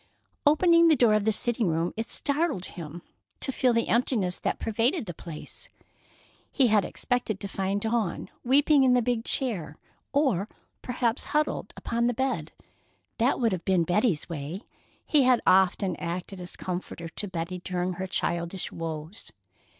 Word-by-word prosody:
Opening 335 +2 +6
the 320 - +6
door 240 -5 +4
of 215 -1 +2
the 220 - +4
sitting 230 0 +1
room, 165 +1 0
it 225 +1 -4
startled 285 - 0
him 165 0 -8 0.4
to - - 0
feel 255 -1 +2
the 230 -1 +1
emptiness 220 -6 +1
that - - -1
pervaded 230 - 0
the 175 - -6
place. 160 -1 -9 0.8
He 260 -4 +3
had 210 -2 +4
expected 245 -1 -2
to 200 - -5
find 195 +1 -2
Dawn 220 -5 -1
weeping 280 +2 +4
in 255 -1 +5
the 245 - +3
big 235 -1 0
chair, 195 - -1 0.3
or 260 - +1 0.3
perhaps 245 -1 -1
huddled 300 +1 -1
upon 235 +1 0
the 245 - 0
bed. 260 +2 -1 0.7
That 240 +4 +2
would 230 -3 +2
have 180 -2 -3
been 185 -3 +2
Betty's 180 -1 +1
way. 165 - -5 0.4
He 300 - +4
had 255 -2 +5
often 190 0 +3
acted 180 +2 -5
as 180 - -8
comforter 175 -2 -5
to 205 +5 -5
Betty 180 0 -4
during 180 0 -2
her 190 +2 -4
childish 170 0 -2
woes. 165 +3 -6
210 Hz, 160 wpm, -27 LUFS, 180-250 Hz, 0.8 s, Opening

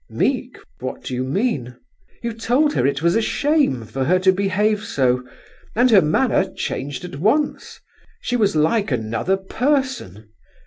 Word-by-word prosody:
"Meek! - - -1 0.2
What - - -6
do - - -5
you 125 +1 -1
mean?" 135 - -1 0.5
"You 235 -1 -2
told 250 +7 +1
her - - +2
it 140 +2 -2
was 170 +1 +3
a 225 - +3
shame 280 - +1
for 130 +4 -3
her 180 +5 +3
to 190 0 +5
behave 200 +2 0
so, 125 - +1 0.5
and 245 +2 +4
her 200 -4 +7
manner 190 +6 +1
changed 140 +4 -4
at 175 -6 -8
once; 285 - 0 0.4
she 245 - -2
was 205 -7 +2
like 165 +8 +2
another 115 - 0
person. 240 - -2
190 Hz, 155 wpm, -21 LUFS, -, 0.5 s, her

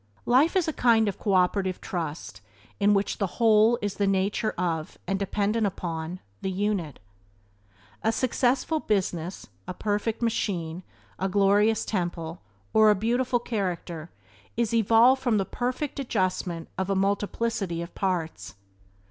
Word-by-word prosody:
Life 275 +9 +4
is 365 -3 +2
a 315 - -1
kind 230 -4 +4
of 200 - -3
cooperative 190 -1 +1
trust 155 - -5 0.4
in 205 +1 +4
which 195 0 -1
the 200 - +1
whole 225 0 +5
is 205 - 0
of - - -18
the 200 - +2
nature 195 +3 +1
of, 165 -3 -2
and 195 +1 -1
dependent 205 +2 0
upon, 170 -1 -5 0.2
the 190 - -2
unit. 190 -6 -1 1.0
A 225 - +2
successful 255 +5 +1
business, 185 - -2 0.2
a 180 - -5
perfect 215 +3 -1
machine, 180 -7 -1 0.4
a 195 - 0
glorious 205 +3 +3
temple, 175 -4 -3 0.3
or 220 0 +6
a 210 - +5
beautiful 245 +5 +1
character 180 -8 -4 0.5
is 235 -1 0
evolved 230 +4 +5
from 240 -5 +2
the 195 - 0
perfect 255 +6 -3
adjustment 185 -8 -1
of 190 0 -1
a 195 - +1
multiplicity 200 -2 -1
of 170 - -10
parts. 180 -4 -3
200 Hz, 140 wpm, -26 LUFS, 180-225 Hz, 1.0 s, or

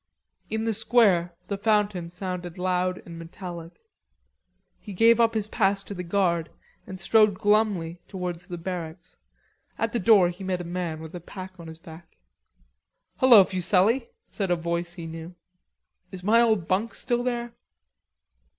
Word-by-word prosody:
In 220 0 -2
the 225 0 0
square 195 -7 +3
the 200 -1 -3
fountain 205 -5 +1
sounded 180 -1 -6
loud 180 0 -1
and 170 -1 -9
metallic. 170 0 -9 1.0
He 205 - -9
gave 230 +4 +5
up 230 -1 +3
his 215 -2 -1
pass 195 -2 +1
to 200 - -7
the 180 - -5
guard 170 -2 0 0.4
and 190 0 -8
strode 215 -1 +4
glumly 200 -5 +1
towards 180 -2 -5
the 175 - -6
barracks. 170 -1 -7 0.6
At 225 -1 -1
the 240 - 0
door 200 -4 +5
he 180 +2 -8
met 185 -1 -2
a - - -5
man 170 -2 -4
with 160 +1 -9
a 175 - -6
pack 185 +1 -10
on 165 - -9
his 160 0 -9
back. 165 0 -14 1.0
"Hullo, 240 -6 +8
Fuselli," 190 +7 +1 0.2
said 195 -3 -3
a 175 - +3
voice 170 +1 -3
he 170 -3 -7
knew. 165 +2 -8 0.8
"Is 185 -2 -8
my 225 +4 +5
old 215 -8 +2
bunk 205 +5 0
still 240 -2 -1
there?" 240 -1 -3
185 Hz, 160 wpm, -26 LUFS, 175-210 Hz, 1.0 s, Hullo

